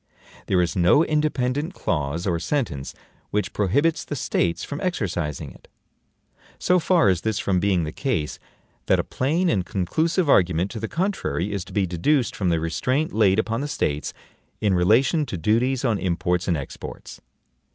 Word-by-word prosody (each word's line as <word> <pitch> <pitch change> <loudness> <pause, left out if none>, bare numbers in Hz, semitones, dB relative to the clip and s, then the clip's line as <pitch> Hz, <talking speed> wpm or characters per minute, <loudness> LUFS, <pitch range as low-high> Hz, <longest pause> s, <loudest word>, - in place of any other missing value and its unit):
There 90 -2 +3
is 85 - -2
no 95 - +4
independent 150 +1 0
clause 75 +1 -2
or 85 -4 0
sentence 85 - -2 0.3
which 105 -2 -1
prohibits 145 - +1
the 145 - -5
States 85 -9 0
from 145 - -5
exercising 90 - -2
it. - - -18 0.9
So 180 0 +3
far 175 - +3
is 90 -3 +2
this 110 +1 -1
from 95 -2 +1
being 95 -3 +1
the 75 - -4
case, 100 - -2 0.5
that - - +4
a - - 0
plain 160 +8 0
and 100 - +1
conclusive 160 - 0
argument 90 - +3
to 115 - -5
the 110 - -3
contrary 170 - -2
is 100 -3 -2
to - - -13
be 100 -3 +1
deduced 115 - +1
from 95 -3 0
the 85 -1 +2
restraint 130 - -1
laid 105 -3 +4
upon 115 +2 0
the 145 - -2
States 75 - -2 0.5
in 105 -3 +2
relation 115 - +3
to 95 - -4
duties 120 - +1
on 110 -5 +1
imports 90 0 -1
and 85 -4 +1
exports. 70 - -8
105 Hz, 170 wpm, -23 LUFS, 90-145 Hz, 0.9 s, no